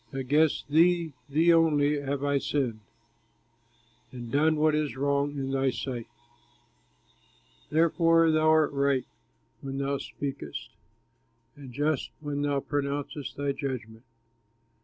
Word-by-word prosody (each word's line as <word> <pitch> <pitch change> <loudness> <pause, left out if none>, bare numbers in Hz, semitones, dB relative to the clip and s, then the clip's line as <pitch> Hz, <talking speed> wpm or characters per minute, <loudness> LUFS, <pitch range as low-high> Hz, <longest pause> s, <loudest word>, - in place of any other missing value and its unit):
Against 145 +4 +1
thee, 165 +1 +3 0.2
thee 165 +4 +4
only 150 -3 +3
have 140 0 -3
I 145 -1 +1
sinned, 130 -6 -1 1.3
And 120 -2 -8
done 155 +3 +3
what 155 0 +2
is 150 -3 -1
wrong 140 +1 0
in 135 -1 -3
thy 135 0 +1
sight; 125 -2 -4 1.6
Therefore 165 +1 +4
thou 155 0 +3
art 155 -1 +4
right 140 -2 +1 0.6
when 135 0 -5
thou 140 0 -1
speakest, 135 - -6 0.8
And 140 -3 -11
just 145 +2 -1
when 145 -2 -3
thou 145 -1 0
pronouncest 145 0 -3
thy 140 0 0
judgment. 125 -5 -5
145 Hz, 115 wpm, -28 LUFS, 135-155 Hz, 1.6 s, thee